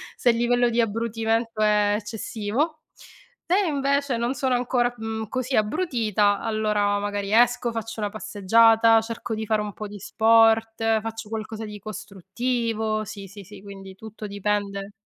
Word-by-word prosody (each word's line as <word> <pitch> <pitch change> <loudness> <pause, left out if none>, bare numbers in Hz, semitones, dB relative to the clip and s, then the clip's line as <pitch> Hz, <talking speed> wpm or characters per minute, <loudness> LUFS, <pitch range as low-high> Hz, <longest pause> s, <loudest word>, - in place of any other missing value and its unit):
se 245 - +2
il 230 - +3
livello 245 0 +2
di 235 +1 -1
abbrutimento 225 0 -1
è 210 -1 +3
eccessivo. 225 +8 -3 0.7
Se 370 +4 +3
invece 280 -3 0
non 240 +3 -1
sono 260 -1 0
ancora, 245 0 +1
mhmm, 220 -1 -4
così 255 +2 -2
abbrutita, 215 - +1
allora 210 -2 0
magari 205 0 -3
esco, 240 +1 +3
faccio 225 0 -5
una 205 -1 -1
passeggiata, 225 +2 +4
cerco 225 0 -5
di 220 0 -4
fare 215 0 +1
un 210 -1 -4
po' 215 - -7
di 205 0 -10
sport, 225 +1 +3 0.2
faccio 225 -1 -6
qualcosa 220 0 -5
di 210 0 -8
costruttivo, 215 +2 -3
sì, 200 -1 -8
sì, 200 +1 -11
sì, 190 - -13
quindi 195 -1 -10
tutto 220 +1 -10
dipende 200 0 -2
220 Hz, 150 wpm, -24 LUFS, 210-235 Hz, 0.7 s, passeggiata